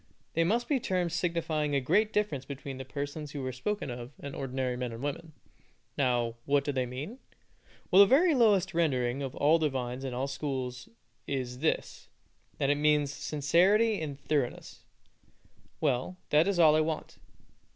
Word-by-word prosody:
They 165 - +2
must 230 +8 +1
be 285 -3 +2
terms 180 -6 -1
signifying 160 -4 -1
a - - +3
great 200 +11 +2
difference 210 -12 -1
between 135 -1 -7
the - - -4
persons 145 +2 -5
who 140 -3 -4
are 130 - -2
spoken 170 +5 -3
of 120 +2 -8
and 140 -1 -7
ordinary 130 -1 -2
men 125 -1 -3
and 115 +3 -8
women. 155 +3 -4 0.6
Now, 120 -4 0
what 140 0 +2
do 145 - -1
they 130 -2 -1
mean? 145 - -7 0.7
Well, 190 - +7
the 200 - +9
very 315 - +5
lowest 215 -8 +3
rendering 135 -6 +1
of 135 -1 -5
all 155 +3 +4
divines 130 -4 -2
and 130 -2 -4
all 130 +2 -1
schools 135 - -4 0.4
is 125 -2 -3
this, 160 - -2 0.5
that 140 - +2
it 145 - 0
means 150 -2 +2
sincerity 180 +10 +2
and 145 -3 -5
thoroughness. 140 -3 -3 0.9
Well, 145 +5 0
that 155 +4 +5
is 200 -2 +1
all 155 -3 +6
I 155 - +4
want. 155 0 -4
145 Hz, 170 wpm, -30 LUFS, 130-170 Hz, 0.9 s, the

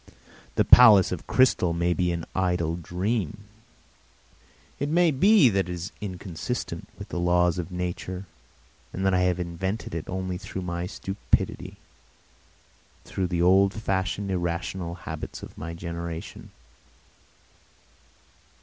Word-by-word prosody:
The - - +3
palace 110 -6 +8
of 90 - -5
crystal 125 -9 +3
may 85 +1 +1
be 90 0 0
an 85 -1 -3
idle 90 -3 0
dream, 90 +3 -2 1.4
it 140 - -1
may 170 +1 +4
be 190 +3 +6
that 95 -4 0
it - - -3
is 90 +2 -5
inconsistent 95 +3 -5
with - - -9
the 90 - -3
laws 90 0 +2
of 85 - -4
nature 90 +1 -4 0.7
and 95 - -2
that 95 - +3
I 90 - +3
have 90 -1 +1
invented 90 +4 -4
it 85 -2 -5
only 95 -1 -3
through 95 -1 -6
my 85 -1 -3
own 90 - -3
stupidity, 95 +1 -2 1.3
through 95 -1 -2
the 85 -1 0
old 95 +2 +4
fashioned 95 -2 -2
irrational 85 0 -2
habits 80 -1 -6
of - - -10
my 85 +2 -6
generation. 85 -1 -6
90 Hz, 130 wpm, -26 LUFS, 85-95 Hz, 1.4 s, palace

